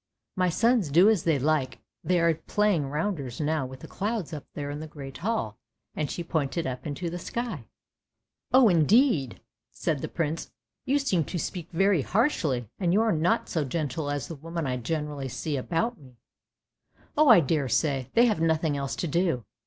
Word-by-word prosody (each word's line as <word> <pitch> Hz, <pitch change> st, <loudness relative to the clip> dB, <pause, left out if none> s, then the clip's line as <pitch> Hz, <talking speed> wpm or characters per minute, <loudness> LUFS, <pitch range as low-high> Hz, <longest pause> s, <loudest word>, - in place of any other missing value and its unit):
" -, -, -59 dB
My 185 Hz, -2 st, +2 dB
sons 225 Hz, -, +2 dB
do 175 Hz, +8 st, +6 dB
as 205 Hz, -7 st, 0 dB
they 160 Hz, -3 st, +3 dB
like, 140 Hz, -1 st, 0 dB, 0.3 s
they 180 Hz, -1 st, +2 dB
are 165 Hz, 0 st, +4 dB
playing 185 Hz, -2 st, 0 dB
rounders 150 Hz, -5 st, -3 dB
now 150 Hz, -3 st, 0 dB
with 130 Hz, 0 st, -11 dB
the -, -, -9 dB
clouds 205 Hz, -4 st, -3 dB
up 150 Hz, -2 st, -6 dB
there 145 Hz, -1 st, -4 dB
in 145 Hz, -, -5 dB
the 155 Hz, -, -6 dB
great 140 Hz, -3 st, -9 dB
hall," 170 Hz, -, -2 dB, 0.3 s
and 150 Hz, -2 st, -2 dB
she 175 Hz, -, -4 dB
pointed 160 Hz, 0 st, -1 dB
up 130 Hz, +4 st, -4 dB
into 150 Hz, +4 st, -4 dB
the 175 Hz, -, -4 dB
sky. 220 Hz, -, -4 dB, 0.4 s
" -, -, -58 dB
Oh 255 Hz, -2 st, +7 dB
indeed! 175 Hz, -, +3 dB, 0.2 s
" -, -, -62 dB
said 155 Hz, -4 st, -2 dB
the -, -, -4 dB
prince. 165 Hz, -1 st, -3 dB, 0.2 s
' -, -, -60 dB
You 275 Hz, +2 st, +3 dB
seem 200 Hz, -, +1 dB
to 180 Hz, -, -4 dB
speak 175 Hz, 0 st, -4 dB
very 195 Hz, -1 st, +3 dB
harshly, 155 Hz, -, 0 dB
and 175 Hz, -3 st, +1 dB
you 210 Hz, -, +4 dB
are 225 Hz, -, +2 dB
not 160 Hz, +2 st, +1 dB
so 160 Hz, -, -1 dB
gentle 145 Hz, +1 st, -2 dB
as 145 Hz, -3 st, -2 dB
the -, -, -6 dB
women 165 Hz, +2 st, -5 dB
I 125 Hz, -1 st, -1 dB
generally 145 Hz, +1 st, -3 dB
see 150 Hz, +4 st, -3 dB
about 180 Hz, -, -1 dB
me! 130 Hz, -4 st, -17 dB, 0.5 s
" -, -, -35 dB
"Oh 300 Hz, -1 st, +5 dB
I 225 Hz, -, +9 dB
daresay, 140 Hz, -3 st, 0 dB
they 235 Hz, +1 st, +6 dB
have 215 Hz, -8 st, +1 dB
nothing 160 Hz, -2 st, +1 dB
else 140 Hz, -1 st, -3 dB
to 175 Hz, -, -2 dB
do! 165 Hz, -, 0 dB
160 Hz, 200 wpm, -27 LUFS, 140-185 Hz, 0.5 s, I